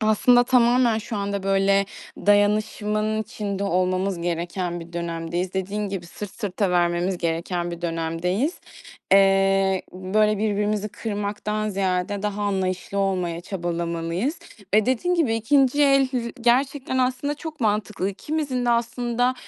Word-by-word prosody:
aslında 245 +3 +4
tamamen 245 -2 +4
şu 225 0 -5
anda, 200 -1 -2
böyle, 195 0 +2 0.3
dayanışmanın 210 +1 +1
içinde 200 -1 -4
olmamız 185 0 0
gereken 175 +1 -2
bir 170 +1 -11
dönemdeyiz. 170 +1 -3
Dediğin 200 +2 -2
gibi 190 -3 -5
"Sırt 205 +3 -8
sırta 200 -2 -2
vermemiz 175 +1 +1
gereken 170 +1 -2
bir 170 0 -7
dönemdeyiz." 170 - -1 0.5
Eee, 195 -1 +4
böyle, 210 +3 +1
birbirimizi 210 0 0
kırmaktan 210 0 -3
ziyade 195 0 -1
daha 210 0 -2
anlayışlı 190 -1 -1
olmaya 180 -4 0
çabalamalıyız 170 - -2 0.4
eee, 215 -1 +4
dediğin 260 +8 +1
gibi 305 -10 +2
2'nci 270 +5 +3
el 275 -2 +4
l - - +2 0.2
gerçekten 260 +2 +1
aslında 255 +3 0
çok 310 0 -8
mantıklı. 210 -3 0
İkimizin 265 +4 -2
de 240 - +2
aslında, 240 +1 0
200 Hz, 125 wpm, -24 LUFS, 185-230 Hz, 0.5 s, aslında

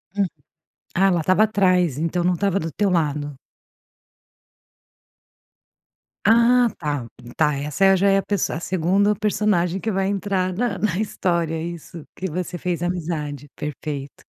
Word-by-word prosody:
Hum. 200 -1 +2 0.7
Ah, 195 +2 +4
ela 175 -3 +2
estava 185 +6 +3
atrás, 185 - +2
então 170 +2 -1
não 180 - +3
estava 195 +1 +1
do 165 -4 -4
teu 205 +5 +1
lado. 150 -4 0 2.9
Ah, 235 +3 +5
tá. 145 -6 -3 0.3
Tá, 150 -2 +3
essa 150 +8 +3
já 195 +2 +3
é 195 - +4
a - - +2
pesso 205 -4 -1
a 155 - -3
segundo 190 +4 +1
personagem 195 -3 +1
que 225 - -3
vai 190 -1 0
entrar 195 -2 -1
na 240 +6 -1
na 205 -5 0
história. 170 -6 -1
Isso, 170 -1 -7
que 190 -1 -4
você 180 +2 -4
fez 175 0 -2
amizade. 155 -5 -3
Perfeito. 145 -1 -6
180 Hz, 140 wpm, -22 LUFS, 160-195 Hz, 2.9 s, Ah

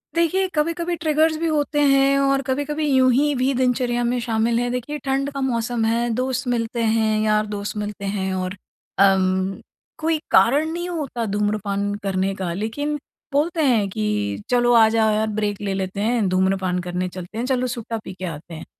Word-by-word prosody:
देखिए 355 +3 +2
कभी-कभी 335 +3 0
ट्रिगर्स 315 -1 +2
भी 330 - -1
होते 295 -1 0
हैं 275 0 +4
और 275 0 +2
कभी-कभी 290 +3 -2
यूँही 265 +2 +3
भी 260 +2 +1
दिनचर्या 245 -1 +1
में 245 +1 0
शामिल 230 0 0
हैं। 245 0 -1
देखिए 250 +4 -3
ठंड 270 +1 0
का 275 -1 -4
मौसम 235 -2 -1
है, 235 +1 +1
दोस्त 255 +1 -2
मिलते 235 -1 -1
हैं, 220 -1 +2
यार-दोस्त 210 -1 -1
मिलते 205 -1 -4
हैं 190 -1 -2
और 185 +1 -3 0.4
अम, 190 0 +3 0.4
कोई 320 0 0
कारण 290 +7 +4
नहीं 345 +1 -3
होता 275 -9 -3
धूम्रपान 205 -1 -1
करने 195 0 0
का 185 -3 -3
लेकिन 255 +10 -2 0.4
बोलते 320 +3 +1
हैं 230 -7 +3
कि 105 - -2
चलो 240 0 +3
आ 225 -2 +7
जाओ 220 -1 +2
यार 215 +1 +1
ब्रेक 210 -1 -2
ले 200 -1 -2
लेते 190 +1 -3
हैं, 225 -2 +1
धूम्रपान 185 0 +1
करने 180 +1 -3
चलते 185 +3 -9
हैं, 235 - -1
चलो 255 -1 0
सुट्टा 235 -2 -4
पी - - -7
के 185 0 -6
आते 165 0 -7
हैं। 155 - -8
230 Hz, 180 wpm, -22 LUFS, 200-275 Hz, 0.4 s, आ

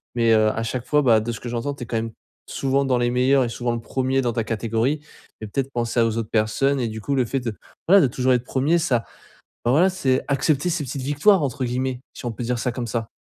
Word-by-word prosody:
mais 115 -1 +3
heu, 110 -1 +4
à 115 - -2
chaque 120 +2 -3
fois, 150 0 +3
bah 115 -4 +5
de 120 - -3
ce 115 - -6
que 120 - -6
j'entends 120 +4 -3
tu 135 - -7
es 115 - -9
quand 115 - -2
même 115 0 -3 0.4
souvent 135 0 0
dans 130 -2 +2
les 120 0 +1
meilleurs 130 +2 +3
et 120 - -2
souvent 120 0 -2
le - - -3
1er 130 +2 0
dans 120 -2 -1
ta 115 - -1
catégorie 115 +6 -1 0.4
et - - -4
peut-être 135 +5 -2
penser 120 0 -1
à 115 - +5
aux 115 0 -2
autres 115 -2 -3
personnes 115 +6 +1
et 120 - 0
du 110 0 -6
coup, 140 - -2
le 130 -2 +2
fait 135 +4 -2
de 115 -3 -4 0.3
voilà 195 +2 +7
de 140 - +4
toujours 130 +1 +1
être 125 -1 +1
1er 145 +7 +1
ça, 125 -8 0 0.6
ben 120 - +2
voilà 175 +7 +5
c'est 135 -9 0
accepter 140 +3 +1
ces 160 -3 -1
«petites 135 +2 -5
victoires» 145 +8 +3
entre 140 -1 -2
guillemets 125 +1 -2
si - - -8
on - - -1
peut 120 - -6
dire 125 +1 -1
ça 120 +1 -1
comme 120 -2 -4
ça. 115 -1 -3
125 Hz, 270 wpm, -23 LUFS, 115-135 Hz, 0.6 s, voilà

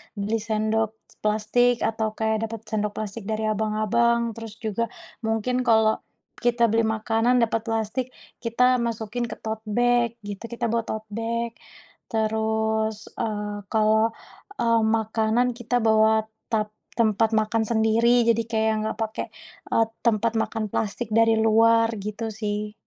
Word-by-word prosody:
beli 210 +2 -1
sendok 220 0 0 0.2
s - - -22
plastik 220 +4 +2
atau 220 -1 -1
kayak 220 0 0
dapat 225 -1 -6
sendok 210 -1 -2
plastik 215 -1 -5
dari 220 0 -2
abang-abang, 225 +2 +1
terus 225 -1 -9
juga 225 +2 -1 0.3
mungkin 225 +3 0
kalau 220 -1 +4 0.3
kita 240 -1 +2
beli 225 +1 +2
makanan 225 +2 +1
dapat 225 0 -1
plastik, 225 +2 -2 0.3
kita 250 +2 +3
masukin 230 0 -2
ke 225 - -6
tote 220 0 -5
bag 240 +1 +2
gitu, 205 +2 -6
kita 235 0 -3
bawa 230 +1 +1
tote 220 -1 -5
bag 230 +1 -2 0.6
terus, 220 -1 0
eee, 210 -1 -2
kalau, 220 0 +3 0.5
eee, 230 -1 +3
makanan 220 +2 +1
kita 240 0 0
bawa 220 -1 +4 0.3
tap 215 -1 0 0.3
tempat 220 0 +3
makan 220 +1 +1
sendiri 230 +2 +3
jadi 230 +1 -1
kayak 220 -1 +1
nggak 220 - -3
pakai, 220 0 -3 0.5
eee, 225 - +5 0.2
tempat 230 0 +2
makan 220 0 -2
plastik 220 +2 -2
dari 225 0 +5
luar 225 +1 +4
gitu 210 +2 -4
sih. 210 0 -3
220 Hz, 140 wpm, -24 LUFS, 215-230 Hz, 0.6 s, eee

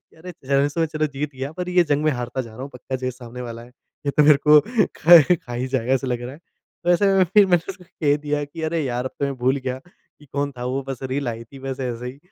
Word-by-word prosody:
कि - - -28
अरे! 180 +3 -9
ज़्यादा 140 +1 +2
सोच 160 +1 -2
रहा 155 0 +1
जीत 145 +2 -3
गया 135 +3 -5
पर 180 +1 -5
ये 180 -1 +4
जंग 145 -1 0
में 155 - +4
हारता 125 +1 -3
जा 115 -2 -12
रहा 125 - -9
हूँ 135 - -6
पक्का 130 +1 -5
जो 130 0 -5
ये - - 0
सामने 125 -1 -10
वाला 115 -1 -7
है 120 - -14 0.4
ये - - +2
तो 150 - +6
मेरे 150 0 +7
को 150 0 +9 0.4
खा 170 +1 +9
खा 120 -7 -9
ही 125 +2 -2
जाएगा 130 -1 -1
ऐसा 135 0 -1
लग 125 -1 -2
रहा 125 +1 -6
है। - - -14 0.5
तो 175 - +2
ऐसे 175 +3 +4
में 190 - +5
फ़िर 195 +3 +5
मैंने 175 -2 +1
उसको 185 -1 -11
कह 145 -3 0
दिया 150 0 -2
कि 155 +3 -9
अरे 160 0 -1
यार! 125 -1 -2
अब 130 - -3
तो 140 - 0
मैं 140 -1 -2
भूल 130 +2 +1
गया 130 -1 -4
कि 150 -4 -25
कौन 140 +1 -3
था 125 - -4
वो 130 +2 -2
बस 135 -1 -5
रील 130 0 -2
आई 115 0 -5
थी 135 - -14
बस 135 0 -4
ऐसे 125 -1 -4
ही। 130 +2 -8
140 Hz, 290 wpm, -22 LUFS, 125-155 Hz, 0.5 s, को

